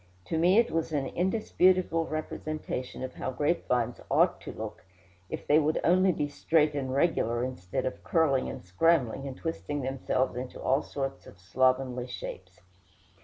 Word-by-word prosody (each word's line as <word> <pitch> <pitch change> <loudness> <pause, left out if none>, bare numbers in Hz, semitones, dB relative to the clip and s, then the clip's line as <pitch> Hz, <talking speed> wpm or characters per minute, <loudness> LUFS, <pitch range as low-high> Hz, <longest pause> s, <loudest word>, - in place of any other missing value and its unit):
To 160 - -2
me 180 +5 +5
it 235 0 +4
was 165 0 -1
an 145 -3 0
indisputable 185 -1 +2
representation 155 -4 -4
of 130 0 -5
how - - -4
grapevines 130 -4 0
ought - - +3
to - - -7
look, - - -7 0.5
if - - -5
they 150 +2 +5
would 155 0 +1
only 185 +2 +4
be 150 -3 -1
straight 150 +1 +2
and 135 -3 -2
regular, 130 -5 +1
instead 125 -9 -3
of 130 - -4
curling 145 -6 +2
and - - -8
scrambling, 135 - +2
and 135 -1 -7
twisting 145 - -3
themselves 130 -1 -1
into 125 +1 -6
all 135 +3 +2
sorts 135 -2 -5
of 95 - -14
slovenly 130 +4 +1
shapes. 90 -6 -8
140 Hz, 160 wpm, -29 LUFS, 125-165 Hz, 0.5 s, me